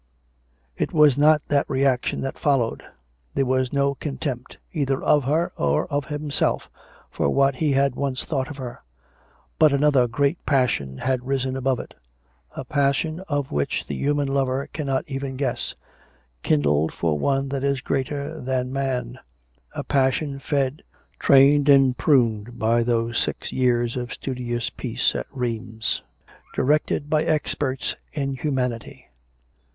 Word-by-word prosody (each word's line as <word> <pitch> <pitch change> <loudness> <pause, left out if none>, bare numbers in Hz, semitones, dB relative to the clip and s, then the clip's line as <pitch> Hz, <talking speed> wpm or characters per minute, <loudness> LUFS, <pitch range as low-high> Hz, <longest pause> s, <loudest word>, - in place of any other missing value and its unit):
It - - -2
Mas 150 -4 +6
not 150 +1 +4
that 145 -1 +1
reaction 130 -2 +1
had 135 - -4
followed; 135 -6 +1 0.5
tjhere - - +2
was 130 -1 +1
no 140 0 +2
contempt, 135 -3 -5 0.2
either 140 -4 0
of 145 -3 +3
her 155 +5 +1
or 75 0 +1
of 145 -1 0
himself, 150 -1 -1 0.4
for - - 0
what 135 - +2
he 150 -1 +1
had 135 -1 +2
once 130 -1 -2
thought 135 -4 -1
of 145 - -8
her; 125 -3 -7 0.8
but 155 -2 +6
another 140 -3 +3
great 140 +7 0
passion 120 - +1
had 130 - -1
risen 135 -1 -1
above 130 -1 0
it - - -9 0.3
— - - -39
a - - -5
passion 145 +3 0
of 145 -2 -1
which 70 -1 -1
the - - -5
human 145 0 0
lover 135 0 0
cannot 135 -4 -1
even 135 -1 -4
guess, 130 -3 -2 0.7
kindled 75 +1 +2
for 80 -3 -1
one 135 - +1
that 135 -1 -3
is 140 -1 +1
greater 140 +3 -3
than 130 0 -2
man; 135 - -2 0.6
a - - -3
passion 135 +1 +1
fed, 140 0 -1 0.4
trained 140 +1 +5
and 135 -2 +6
pruned 120 -5 +2
by 115 +1 +2
those 115 0 0
six - - -3
years 120 -2 +1
of 125 -1 -4
studious 120 -3 -3
peace - - -1
at - - -4
Rheims, 115 -3 -3 0.5
directed 145 +1 +1
by 155 0 +2
experts 145 -3 -1 0.2
in 140 -2 -2
humanity. 125 -4 -3
135 Hz, 145 wpm, -23 LUFS, 125-140 Hz, 0.8 s, Mas